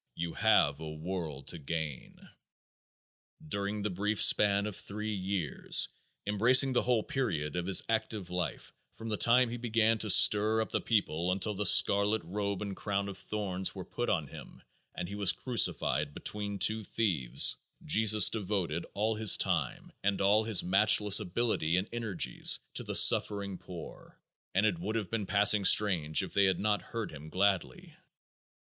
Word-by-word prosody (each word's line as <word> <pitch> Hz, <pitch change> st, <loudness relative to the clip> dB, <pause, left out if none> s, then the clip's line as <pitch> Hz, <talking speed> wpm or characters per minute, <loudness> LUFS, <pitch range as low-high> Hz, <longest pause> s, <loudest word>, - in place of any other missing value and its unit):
You 85 Hz, 0 st, -5 dB
have 70 Hz, 0 st, +1 dB
a 80 Hz, -1 st, -8 dB
world 80 Hz, -3 st, -7 dB
to 85 Hz, -, -4 dB
gain._" 80 Hz, -2 st, -7 dB, 1.2 s
During 100 Hz, -4 st, -4 dB
the 105 Hz, -, -3 dB
brief 105 Hz, +3 st, -3 dB
span 100 Hz, -1 st, +4 dB
of 105 Hz, -2 st, -6 dB
three 105 Hz, +3 st, -7 dB
years, 95 Hz, -6 st, -1 dB, 0.4 s
embracing 125 Hz, +6 st, +4 dB
the 120 Hz, -, +1 dB
whole 120 Hz, -3 st, 0 dB
period 85 Hz, -, -4 dB
of 90 Hz, 0 st, -4 dB
his 95 Hz, -, +4 dB
active 110 Hz, -4 st, -4 dB
life, 90 Hz, -2 st, -5 dB, 0.2 s
from 115 Hz, 0 st, -9 dB
the 105 Hz, -, -1 dB
time 120 Hz, +2 st, +2 dB
he 120 Hz, -, -5 dB
began 115 Hz, -1 st, 0 dB
to 110 Hz, -, -4 dB
stir 105 Hz, +3 st, +5 dB
up 110 Hz, -, -3 dB
the -, -, -2 dB
people 90 Hz, -6 st, -1 dB
until 100 Hz, +3 st, -3 dB
"the 100 Hz, 0 st, +1 dB
scarlet 100 Hz, +3 st, +4 dB
robe 100 Hz, +3 st, -4 dB
and 100 Hz, -2 st, -7 dB
crown 100 Hz, 0 st, -4 dB
of 95 Hz, -1 st, -10 dB
thorns 95 Hz, -3 st, -5 dB
were 95 Hz, -, -8 dB
put 120 Hz, -, -5 dB
on 80 Hz, -7 st, -1 dB
him -, -, -14 dB, 0.3 s
and 90 Hz, -, -5 dB
he 100 Hz, -, -9 dB
was 100 Hz, -2 st, +2 dB
crucified 85 Hz, -, 0 dB
between 100 Hz, -1 st, -5 dB
two 110 Hz, +3 st, +2 dB
thieves," 85 Hz, -, +1 dB, 0.3 s
Jesus 105 Hz, +2 st, +4 dB
devoted 95 Hz, -6 st, -4 dB
all 110 Hz, +2 st, -1 dB
his 110 Hz, -2 st, +6 dB
time -, -, -3 dB
and 100 Hz, 0 st, -1 dB
all 105 Hz, +3 st, +2 dB
his 110 Hz, -4 st, +3 dB
matchless 105 Hz, +2 st, +3 dB
ability 90 Hz, -4 st, -1 dB
and 95 Hz, +3 st, -2 dB
energies 110 Hz, -7 st, 0 dB, 0.2 s
to -, -, -6 dB
the -, -, -5 dB
suffering 100 Hz, -2 st, +4 dB
poor, 90 Hz, -2 st, -12 dB, 0.4 s
and 100 Hz, +3 st, +2 dB
it 165 Hz, +10 st, -1 dB
would 115 Hz, -10 st, -5 dB
have 105 Hz, -5 st, -4 dB
been 110 Hz, -4 st, -4 dB
passing 105 Hz, 0 st, +3 dB
strange 90 Hz, -6 st, +3 dB
if 95 Hz, -, -9 dB
they 100 Hz, -, +2 dB
had 95 Hz, -2 st, 0 dB
not 105 Hz, 0 st, -1 dB
"heard 115 Hz, -2 st, -7 dB
him 75 Hz, +1 st, -11 dB
gladly." 95 Hz, +1 st, -2 dB
100 Hz, 165 wpm, -29 LUFS, 90-110 Hz, 1.2 s, his